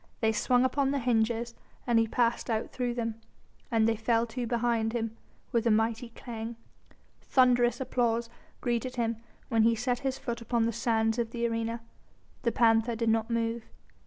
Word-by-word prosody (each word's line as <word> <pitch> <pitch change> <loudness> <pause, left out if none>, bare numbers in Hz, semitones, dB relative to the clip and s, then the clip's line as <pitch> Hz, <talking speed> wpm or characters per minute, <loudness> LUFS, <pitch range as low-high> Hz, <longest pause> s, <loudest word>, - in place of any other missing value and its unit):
They 220 -1 +3
swung 245 +3 +2
upon 275 +1 +1
their 280 0 0
hinges 235 -1 +1 0.3
and 235 -2 +3
he 225 - +2
passed 235 +2 0
out 220 -1 -1
through 245 -2 -2
them. 225 -2 -3 0.5
And 225 -2 +3
they 225 - +2
fell 225 +1 +1
to 235 +1 -4
behind 230 -1 0
him 225 -2 -2 0.4
with 235 0 +1
a - - +5
mighty 225 +2 +1
clang. 230 -1 -7 0.7
Thunderous 245 -1 +3
applause 235 -3 0 0.3
greeted 245 +1 -1
him 230 -2 0 0.3
when 230 -3 +3
he 230 +1 +4
set 245 +1 -1
his 270 -1 -2
foot 235 -1 -4
upon 230 -1 +1
the 230 - 0
sands 225 0 +1
of 230 -1 0
the 235 0 -2
arena. 230 0 -2 0.6
The 235 - +1
panther 230 -1 +3
did 230 0 0
not 225 +1 +1
move. 230 0 -1
230 Hz, 175 wpm, -29 LUFS, 225-240 Hz, 0.7 s, a